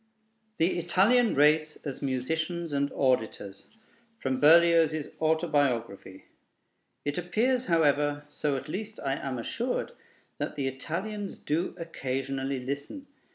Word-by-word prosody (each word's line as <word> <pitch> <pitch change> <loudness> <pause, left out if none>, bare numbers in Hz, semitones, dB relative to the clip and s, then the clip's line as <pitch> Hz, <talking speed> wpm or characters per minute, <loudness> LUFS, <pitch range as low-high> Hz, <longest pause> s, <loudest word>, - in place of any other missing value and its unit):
THE 170 +2 +2
ITALIAN 210 +8 +3
RACE 150 +2 +4
AS 140 -3 -5
MUSICIANS 160 +6 -2
AND 140 0 0
AUDITORS 110 -7 -1 0.5
From 130 - -2
Berlioz's 160 -1 +5
Autobiography 140 - 0 0.8
It 145 +3 -1
appears, 240 +8 0
however, 145 -3 +2
so 145 -1 -2
at - - -7
least 215 +6 -5
I 135 - -1
am 135 -2 -4
assured, 240 - -2 0.5
that - - -3
the 140 -2 -1
Italians 195 +10 -4
do 165 +5 -2
occasionally 135 -4 -3
listen. 140 - -5
150 Hz, 110 wpm, -28 LUFS, 135-170 Hz, 0.8 s, Berlioz's